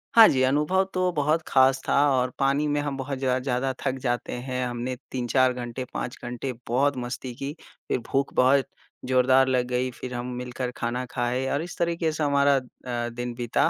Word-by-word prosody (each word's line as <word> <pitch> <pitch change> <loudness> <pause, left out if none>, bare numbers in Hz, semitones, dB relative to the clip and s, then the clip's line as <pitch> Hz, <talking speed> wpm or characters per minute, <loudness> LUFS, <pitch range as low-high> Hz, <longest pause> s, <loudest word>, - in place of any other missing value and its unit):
हाँ 225 -2 +10
जी, 130 - +2
अनुभव 150 +8 +2
तो 185 0 +1
बहुत 155 +1 +1
खास 130 0 +4
था - - +2 0.2
और 130 -1 +2
पानी 140 +2 +2
में 145 0 +1
हम 145 -1 -3
बहुत 135 0 -4
ज 130 -1 +1
ज़्यादा 130 0 0
थक 130 - 0
जाते 120 -1 -1
हैं। 125 0 -3
हमने 120 +1 -3 0.2
3-4 130 +1 +2
घंटे, 120 0 -5
5 125 - -4
घंटे 125 +2 -4
बहुत 135 +3 +2
मस्ती 125 +1 -5
की। 140 +4 -5 0.3
फिर - - 0
भूख 135 0 0
बहुत 130 +2 +4 0.4
जोरदार 130 +1 +4
लग 125 -1 +1
गई। 125 +1 -1
फिर 125 - -5
हम 125 +1 -4
मिलकर 125 0 -4
खाना 125 +2 -2
खाए 125 +1 -1
और 145 - 0
इस 175 - -8
तरीके 170 -1 +1
से 155 0 -2
हमारा 140 -1 +4
अ, 120 -2 -5
दिन 120 +1 -5
बीता 120 -2 +1
130 Hz, 195 wpm, -26 LUFS, 125-140 Hz, 0.4 s, हाँ